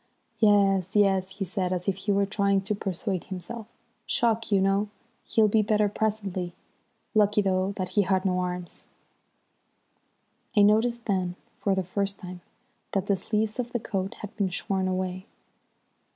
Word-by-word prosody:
"Yes, 200 -3 +4
yes," 195 -2 +3
he 195 - -2
said, 185 0 -2
as 180 0 -2
if 195 - +2
he 195 +2 -2
were 200 0 +3
trying 200 -1 +1
to 195 +2 -1
persuade 195 -1 -3
himself. 205 +5 -7 0.4
"Shock, 230 -1 +1
you 200 - +5
know. 195 +2 +2 0.4
He'll 220 -1 +4
be 215 +1 +3
better 210 0 +2
presently. 200 -4 -2 0.6
Lucky, 210 -1 +4
though, 190 0 +1
that 185 -2 -3
he 205 +3 +3
had 190 0 +1
no 180 -1 +2
arms." 180 -1 -4 1.7
I 205 - +8
noticed 230 +3 +3
then, 185 -4 0 0.2
for 195 -2 +1
the 190 - 0
first 200 +2 -2
time, 180 -2 -9 0.5
that 195 -1 0
the 200 - +2
sleeves 215 +4 -1
of 240 -1 -3
the 240 - +1
coat 195 -3 -3
had 210 - -8
been 200 -3 +1
shorn 190 +1 -1
away. 185 0 -2
195 Hz, 160 wpm, -27 LUFS, 185-210 Hz, 1.7 s, I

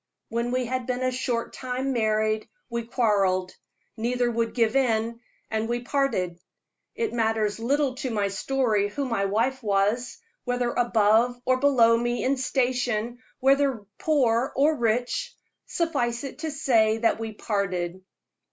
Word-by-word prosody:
When 235 +1 -1
we 255 0 0
had 255 0 -3
been 250 0 -1
a 255 - +1
short 250 -2 -2
time 260 +1 -3
married, 215 -1 0 0.2
we 235 -1 -2
quarreled. 195 -6 +1 0.4
Neither 240 +1 0
would 230 -1 -1
give 230 0 +2
in, 230 -3 +1 0.3
and 220 +1 -1
we 240 0 -1
parted. 240 -11 -1 0.6
It 455 -2 -2
matters 220 -2 0
little 275 +3 +1
to 265 -1 -3
my 205 -3 0
story 215 -1 0
who 280 +7 -3
my 230 -6 0
wife 235 +7 0
was, 210 +4 0 0.3
whether 245 -1 -1
above 235 +1 +3
or 255 0 +3
below 255 -4 +5
me 240 +1 -1
in 270 +2 +2
station, 245 -3 -1 0.2
whether 270 -4 +2
poor 260 -4 +2
or 300 +3 +3
rich 240 -1 -1 0.3
suffice 240 -8 -1
it 275 - -7
to 320 0 -3
say 230 -7 +2
that 225 0 +1
we 225 -1 -4
parted. 185 -4 -2
240 Hz, 145 wpm, -26 LUFS, 220-255 Hz, 0.6 s, below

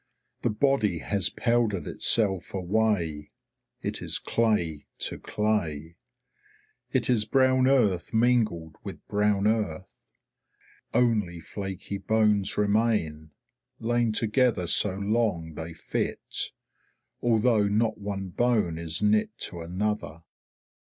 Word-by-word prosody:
The - - +1
body 105 -5 +1
has 100 +2 +1
powdered 115 -6 0
itself 100 -5 +2
away; 90 -6 0 0.5
it - - -2
is - - -1
clay 95 -10 0
to - - -3
clay. 85 -7 -2 1.0
It - - +1
is 115 -4 +2
brown 130 +2 +3
earth 105 -11 +2
mingled 110 -9 +1
with - - -9
brown 105 -1 +1
earth. 105 -6 -2 0.9
Only 105 -8 +1
flaky 95 +3 -6
bones 105 -1 +2
remain, 100 -8 +1 0.5
lain 120 0 +1
together 110 -2 +1
so 95 +3 +2
long 100 -5 -1
they 80 +2 -6
fit, - - -3 0.7
although 115 -2 +3
not 110 +2 0
one 100 -2 -4
bone 105 -5 +1
is 80 +3 -3
knit 105 0 +3
to 85 - -5
another. 90 -2 -3
105 Hz, 105 wpm, -27 LUFS, 85-115 Hz, 1.0 s, brown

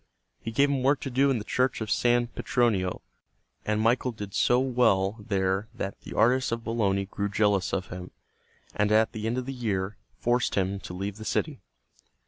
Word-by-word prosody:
He - - -4
gave 140 +5 +3
him 140 -2 0
work 135 +2 +3
to 135 - -4
do 135 +3 +3
in 135 - +2
the 105 - -4
Church 130 +3 0
of 110 -1 -4
San 120 0 +3
Petronio, 115 -6 0 0.6
and 105 0 +1
Michael 120 +3 +2
did 105 -4 -8
so 120 - +3
well 120 -7 +2
there 95 0 -1
that 100 -4 -5
the - - -9
artists 125 +3 +3
of 115 0 -2
Bologna 100 -4 0
grew 100 +1 -3
jealous 105 -2 +1
of 95 -1 -2
him, 90 0 -7 0.6
and 105 0 +1
at 110 +1 +4
the 110 0 -4
end 120 +2 -1
of 130 - -2
the 135 - -4
year 105 -5 -2 0.2
forced 120 +1 +1
him 95 0 0
to 90 - -8
leave 100 +2 -4
the 110 - -8
city. 140 +3 -2
110 Hz, 195 wpm, -27 LUFS, 100-125 Hz, 0.6 s, at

